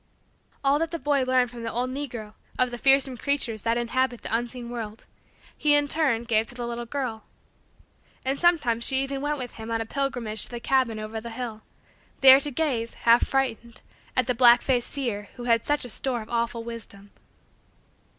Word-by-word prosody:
All 280 +1 +3
that 330 0 -1
the 335 - -4
boy 290 -3 +1
learned 255 -1 +2
from 240 -1 -9
the 230 -1 -4
old 250 +3 -2
negro, 240 -6 -6 0.2
of 250 -1 +1
the 240 - -6
fearsome 270 0 +5
creatures 250 -6 0
that 230 +2 0
inhabit 245 +1 -1
the - - -1
unseen 240 0 -4
world, 225 -2 -7 0.5
he, 295 -1 +3
in 290 0 +2
turn, 275 -7 +1
gave 225 -1 +1
to - - -7
the 240 -1 -4
little 235 0 -5
girl. 245 -4 -4 1.0
And 270 +1 0
sometimes 280 -10 +2
she 265 +2 +2
even 275 0 -4
went 295 +1 -1
with 250 -3 -7
him 220 0 -8
on 225 0 -1
a 225 - -3
pilgrimage 245 -4 +1
to - - -10
the 240 - -6
cabin 255 -3 +1
over 215 +1 -5
the 235 - -7
hill; 230 -2 -6 0.6
there 265 0 +9
to 290 - -1
gaze, 255 -6 -2
half 235 +1 +4
frightened, 235 -4 -2 0.3
at 255 - +3
the 250 - 0
black 240 0 +6
faced 250 -3 0
seer 230 -7 -4
who 245 - -8
had 230 -2 +1
such 295 0 +1
store 245 0 -3
of 215 - -15
awful 235 0 -1
wisdom. 205 -4 -7
245 Hz, 195 wpm, -25 LUFS, 230-270 Hz, 1.0 s, there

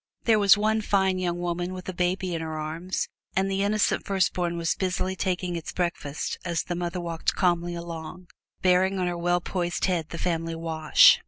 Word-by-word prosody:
There 220 -2 +4
was 200 0 +7
one 215 +1 +2
fine 190 -2 +2
young 175 -1 -1
woman 175 +1 -2
with 185 - -8
a 185 - -3
baby 180 +1 0
in 165 - -2
her 160 -1 -4
arms, 165 +4 -3 0.3
and 195 +1 +1
the 195 0 0
innocent 205 +1 +2
firstborn 180 -3 0
was 165 -1 +1
busily 185 0 -1
taking 180 -1 -1
its 165 - -5
breakfast 170 -5 -2
as 170 -3 -1
the 175 - -3
mother 175 +1 -3
walked 170 -2 -1
calmly 175 -2 +1
along, 170 +1 -7 0.4
bearing 185 +1 +4
on 185 - 0
her 175 0 -1
well 175 +1 +1
poised 175 -1 -1
head 170 -4 0
the 170 - -6
family 165 -1 -1
wash. 160 -2 +5
175 Hz, 190 wpm, -26 LUFS, 170-185 Hz, 0.4 s, was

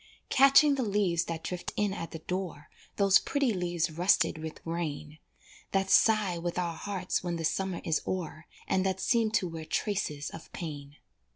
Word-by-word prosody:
Catching 275 +2 +6
the 275 - -1
leaves 195 -5 +1
that 165 -1 -5
drift 180 -1 -4
in 205 -2 0
at 165 -4 -5
the - - -7
door, 180 -2 -5 0.2
Those 195 -1 +5
pretty 275 -5 0
leaves 175 -3 -1
rusted 170 0 +2
with 160 0 -7
rain, 155 -2 -4 0.5
That 195 0 +1
sigh 210 -6 +4
with 175 +1 -3
our 170 -2 -1
hearts 185 0 -3
when 175 -1 -2
the 165 -1 -3
summer 190 +2 -1
is 160 -4 0
o'er, 165 -3 -4 0.2
And 185 - +1
that 190 0 -1
seem 230 0 +2
to 185 - +2
wear 165 -1 -7
traces 155 -5 -2
of 165 - -11
pain. 145 -4 -7
175 Hz, 175 wpm, -29 LUFS, 165-195 Hz, 0.5 s, Catching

